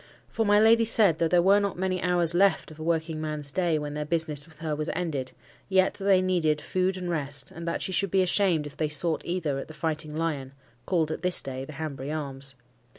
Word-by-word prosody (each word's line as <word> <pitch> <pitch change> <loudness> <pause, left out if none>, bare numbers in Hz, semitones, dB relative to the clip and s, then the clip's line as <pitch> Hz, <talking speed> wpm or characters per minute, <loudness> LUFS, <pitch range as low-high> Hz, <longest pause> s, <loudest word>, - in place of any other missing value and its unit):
For 225 -2 -1
my 205 0 +5
lady 225 +1 +5
said, 210 -7 +4
though 165 - +2
there 175 +1 +3
were 200 +2 +5
not 200 -3 -2
many 185 -1 -1
hours 175 -2 +2
left 185 -3 +2
of 155 - -13
a - - -5
working 160 -1 -1
man's 150 -2 -3
day 170 0 +1
when 150 -1 -4
their 150 0 -3
business 155 -2 +1
with 160 -2 -19
her 155 -1 -3
was 155 +2 -2
ended, 150 -7 -3 0.4
yet 190 -1 +3
that 195 - -8
they 190 -2 +4
needed 165 -5 +1
food 185 +3 -1
and 180 -1 -5
rest, 145 -5 -1
and 170 +1 -8
that 170 - -2
she - - -3
should 195 +1 0
be 190 +1 +3
ashamed 180 -4 +2
if 145 -1 -9
they 155 -1 -1
sought 155 +2 +1
either 165 -6 -2
at - - -7
the 155 - -11
Fighting 155 -2 -3
Lion 145 -5 -3 0.3
(called 165 -4 +1
at 155 - -4
this 180 0 +3
day 130 0 -6
the 155 - -10
Hanbury 145 -2 -5
Arms). 135 -3 -4
165 Hz, 235 wpm, -27 LUFS, 150-185 Hz, 0.4 s, my